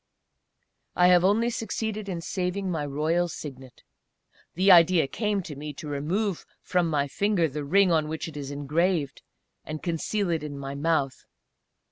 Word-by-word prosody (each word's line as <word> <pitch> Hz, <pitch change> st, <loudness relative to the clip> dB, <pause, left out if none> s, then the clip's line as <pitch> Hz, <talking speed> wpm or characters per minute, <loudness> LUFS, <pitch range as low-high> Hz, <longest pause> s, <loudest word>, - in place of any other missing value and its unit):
I 180 Hz, 0 st, +5 dB
have 180 Hz, -1 st, +6 dB
only 220 Hz, +5 st, +3 dB
succeeded 220 Hz, -2 st, -3 dB
in 175 Hz, -3 st, -3 dB
saving 185 Hz, +2 st, -2 dB
my 150 Hz, -4 st, -2 dB
royal 160 Hz, +5 st, 0 dB
Signet. 135 Hz, -6 st, -9 dB, 0.7 s
The 190 Hz, +3 st, +5 dB
idea 170 Hz, -2 st, +6 dB
came 205 Hz, +6 st, -1 dB
to 150 Hz, -, -8 dB
me 150 Hz, +1 st, -6 dB
to 150 Hz, +2 st, -9 dB
remove 170 Hz, +7 st, -2 dB, 0.2 s
from 180 Hz, -2 st, +1 dB
my 145 Hz, -2 st, +1 dB
finger 200 Hz, +2 st, +1 dB
the 150 Hz, 0 st, -5 dB
ring 185 Hz, +5 st, +4 dB
on 155 Hz, -2 st, +2 dB
which 160 Hz, +2 st, -4 dB
it 160 Hz, -, -9 dB
is 140 Hz, -2 st, -5 dB
engraved, 145 Hz, +1 st, -1 dB, 0.4 s
and 155 Hz, 0 st, -7 dB
conceal 175 Hz, +3 st, -1 dB
it 165 Hz, -2 st, 0 dB
in 150 Hz, -2 st, -6 dB
my 140 Hz, 0 st, -5 dB
mouth. 140 Hz, -2 st, -1 dB
165 Hz, 160 wpm, -26 LUFS, 145-185 Hz, 0.7 s, have